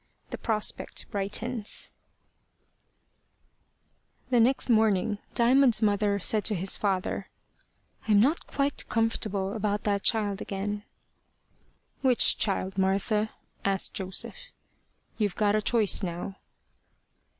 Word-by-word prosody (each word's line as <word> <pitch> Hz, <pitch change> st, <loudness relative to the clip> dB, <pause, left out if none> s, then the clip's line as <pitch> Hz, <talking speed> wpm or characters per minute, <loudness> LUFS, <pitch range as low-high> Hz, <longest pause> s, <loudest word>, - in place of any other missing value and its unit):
THE -, -, -4 dB
PROSPECT 215 Hz, -2 st, -2 dB
BRIGHTENS 210 Hz, +3 st, -3 dB, 2.4 s
THE 245 Hz, -, +4 dB
next 255 Hz, +4 st, +2 dB
morning, 220 Hz, -2 st, +2 dB, 0.2 s
Diamond's 240 Hz, -1 st, +4 dB
mother 205 Hz, -1 st, +2 dB
said 210 Hz, +2 st, +2 dB
to 215 Hz, -, +2 dB
his 190 Hz, +2 st, +1 dB
father, 195 Hz, -1 st, -2 dB, 0.8 s
"I'm 210 Hz, -2 st, +5 dB
not 280 Hz, +10 st, +1 dB
quite 280 Hz, 0 st, -2 dB
comfortable 215 Hz, -4 st, -1 dB
about 210 Hz, -2 st, -2 dB
that 200 Hz, -1 st, 0 dB
child 205 Hz, -3 st, 0 dB
again." 205 Hz, +1 st, -4 dB, 1.2 s
"Which 255 Hz, -3 st, +4 dB
child, 195 Hz, -2 st, -1 dB
Martha?" 200 Hz, +3 st, +1 dB, 0.3 s
asked 195 Hz, -1 st, +1 dB
Joseph. 195 Hz, -, -4 dB, 0.7 s
"You've 205 Hz, -4 st, 0 dB
got 210 Hz, -1 st, +2 dB
a 215 Hz, -, +1 dB
choice 220 Hz, -2 st, +3 dB
now." 180 Hz, +1 st, -5 dB
210 Hz, 105 wpm, -27 LUFS, 195-225 Hz, 2.4 s, I'm